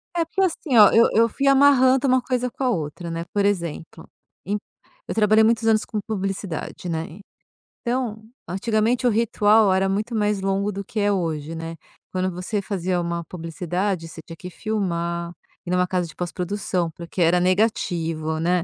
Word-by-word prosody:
É, 335 - +1
porque, 380 +4 -2
assim, 320 -8 +1
ó, 210 -2 +9
eu 230 - +6
eu 230 +1 +4
fui 275 +5 -1
amarrando 270 -1 +5
uma 255 0 +3
coisa 250 -1 -1
com 270 - -5
a 255 - +2
outra, 170 -3 -3
né, 165 0 -3
por 200 -1 +2
exemplo, 170 -4 -3 0.4
em 205 +2 -1 0.5
eu - - -4
trabalhei 215 0 +5
muitos 225 0 +2
anos 215 -1 +3
com 215 - -3
publicidade, 195 -4 -4
né, 160 +2 -4 0.6
então 235 -3 -2 0.2
antigamente 220 +5 0
o 240 - +4
ritual 215 -2 +3
era 190 +1 +2
muito 215 +4 -2
mais 210 -2 +1
longo 195 +1 0
do 200 +1 -5
que 215 +2 -5
é 205 0 +2
hoje, 165 -4 -2
né. 165 0 -6 0.4
Quando 185 0 -1
você 185 +4 -3
fazia 185 -2 -1
uma 170 0 -3
publicidade, 175 +2 -3
você 160 0 -10
tinha 165 - -9
que 180 - -8
filmar, 170 -5 -3 0.3
ir - - -6
numa 180 0 +2
casa 180 -2 -1
de 155 - -14
pós-produção, 180 0 -2
porque 170 +2 -6
era 170 +2 +4
negativo, 170 -5 0
né, 175 +1 +1
195 Hz, 175 wpm, -23 LUFS, 170-220 Hz, 0.6 s, ó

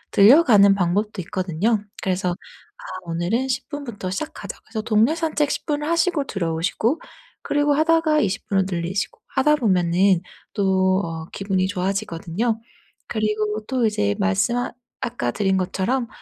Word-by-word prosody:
늘려가는 205 -3 +7
방법도 200 +2 0
있거든요. 195 +4 -1 0.2
그래서 185 -1 0
'아 - - -13 0.2
오늘은 175 +10 -1
10 255 - -2
분부터 240 -11 -5
시작하자' 305 +11 -5
그래서 220 - -4
동네 220 +7 +3
산책 310 -3 0
10 - - -3
분을 295 0 -1
하시고 335 -3 +1
들어오시고 185 - -1 0.4
그리고 290 0 +1
하다가 315 0 +3
20 200 -1 -1
분으로 195 -1 +2
늘리시고 175 +2 -3 0.2
하다 300 +3 +4
보면은 185 -4 +3 0.3
또 190 -2 +2
어 165 -1 -5
기분이 195 -2 -1
좋아지거든요. 195 +2 -2 0.5
그리고 215 -1 -1
또 255 -3 +1
이제 100 - +1
말씀 95 - +1
아 245 - -2 0.3
아까 120 - -2
드린 190 - +1
것처럼 225 +7 -1
205 Hz, 320 characters per minute, -22 LUFS, 185-255 Hz, 0.5 s, 늘려가는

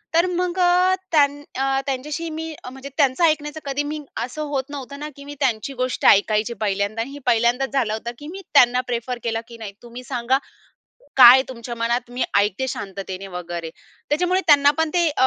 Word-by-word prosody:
तर 335 - +5
मग 360 0 -2
अ, 360 +1 +4 0.2
त्यांन 290 -2 +3
अ, 270 +1 +1
त्यांच्याशी 295 +5 -3
मी 320 0 -5
अ - - -7
म्हणजे 265 +2 -9
त्यांचं 275 +1 +2
ऐकण्याचं 305 -1 0
कधी 280 +1 -1
मी 305 0 -4 0.2
असं 280 +5 -5
होत 275 -2 -1
नव्हतं 280 0 -7
ना 300 +1 -5
की 280 - -12
मी 290 0 -8
त्यांची 260 -1 -1
गोष्ट 255 - -3
ऐकायची 215 +3 +4
पहिल्यांदा 205 +2 -1
आणि 255 +4 -5
हे 285 - -9
पहिल्यांदाच 240 +3 +2
झालं 235 -6 +1
होतं 235 +2 -4
की 295 - -9
मी 380 +4 -8
त्यांना 250 -2 +5
प्रिफर 245 0 -3
केला 225 -1 -1
की 235 - -11
नाही 215 -3 -8
तुम्ही 240 +1 -10
सांगा 250 +1 0 0.8
काय 255 0 +10
तुमच्या 240 -1 -7
मनात, 235 +1 -1
मी 245 +1 -3 0.2
ऐकते 205 +5 0
शांततेने 195 -2 -6
वगैरे. 175 -2 -6 0.4
त्याच्यामुळे 360 +5 +2
त्यांना 285 -2 +6
पण 320 -1 +1
ते 350 -1 +3
एक 305 - +1
260 Hz, 195 wpm, -22 LUFS, 235-295 Hz, 0.8 s, काय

